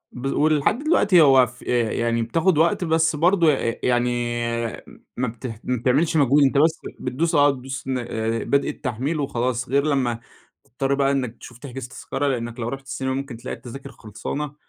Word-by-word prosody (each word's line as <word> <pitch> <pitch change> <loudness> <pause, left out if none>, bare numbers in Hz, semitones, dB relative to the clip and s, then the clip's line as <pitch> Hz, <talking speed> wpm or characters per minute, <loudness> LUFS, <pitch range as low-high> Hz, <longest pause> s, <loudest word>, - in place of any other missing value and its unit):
بال 135 +3 -3
ولحد 155 - +2
دلوقتي 205 - +4
هو 135 -4 +6
ف 125 +2 -15
آآ 120 -3 +1
يعني 115 0 0
بتاخد 160 +8 +1
وقت، 170 +2 +2
بس 160 -1 +2
برضه 170 0 +4
أ - - +2
ي 115 - -3
يعني 125 0 +2 1.1
ما 125 0 -1
بته 115 -1 -7
ما 125 - 0
بتعملش 135 +8 +1
مجهود، 145 0 +4
أنت 135 0 +3
بس 160 +2 +3 0.2
بتدوس 135 +6 -1
آه، 145 0 +5
بتدوس 135 0 -6
ن 130 -1 -1
آآ، 115 -1 -2
بدء 140 0 +1
التحميل 135 +5 -3
وخلاص، 125 -2 -2
غير 140 +2 +2
لما 130 -5 0 0.4
تضطر 135 +3 -2
بقى 140 0 +2
إنك 125 -4 -2
تشوف 120 - -12
تحجز 130 -2 -8
تذكرة، 135 +2 -3
لأنك 120 -2 -3
لو 115 - -2
رُحت 135 +1 -6
السينما 130 +1 -3
ممكن 135 -3 -5
تلاقي 120 +3 -6
التذاكر 135 +3 -10
خلصانة، 135 +8 -6
135 Hz, 185 wpm, -23 LUFS, 120-145 Hz, 1.1 s, هو